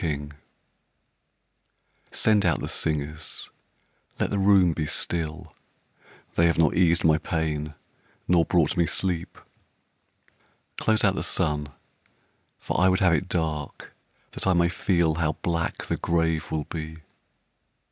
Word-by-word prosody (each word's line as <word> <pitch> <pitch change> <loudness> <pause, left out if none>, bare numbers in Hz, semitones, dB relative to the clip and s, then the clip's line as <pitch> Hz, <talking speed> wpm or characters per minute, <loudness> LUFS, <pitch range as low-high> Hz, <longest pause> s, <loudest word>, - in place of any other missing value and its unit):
Beatrice 75 -3 -2 1.8
Send 105 -2 +3
out 85 -5 +2
the - - -4
singers 75 0 -3 0.7
let - - 0
the 100 - 0
room 95 -3 +5
be 75 -1 -3
still; 80 +2 -3 0.8
They 85 - +4
have 85 - +1
not 80 -2 +3
eased 85 -1 +3
my 80 -1 +4
pain 75 -2 -2 0.5
nor 85 -2 +4
brought 85 -2 +2
me 85 -2 +2
sleep. 90 -2 -2 1.4
Close 110 -1 +1
out 100 -2 +4
the - - -3
sun, 75 -4 -1 0.9
for - - -2
I 95 - +5
would 95 - +2
have 90 -3 +4
it 90 +2 0
dark 80 -4 -3 0.4
That - - -4
I 95 - +4
may 85 -1 +3
feel 85 -2 +1
how 80 -2 +1
black 85 -1 -2
the - - -2
grave 80 -2 0
will 80 -1 -2
be. 80 0 -7
85 Hz, 135 wpm, -25 LUFS, 80-90 Hz, 1.8 s, room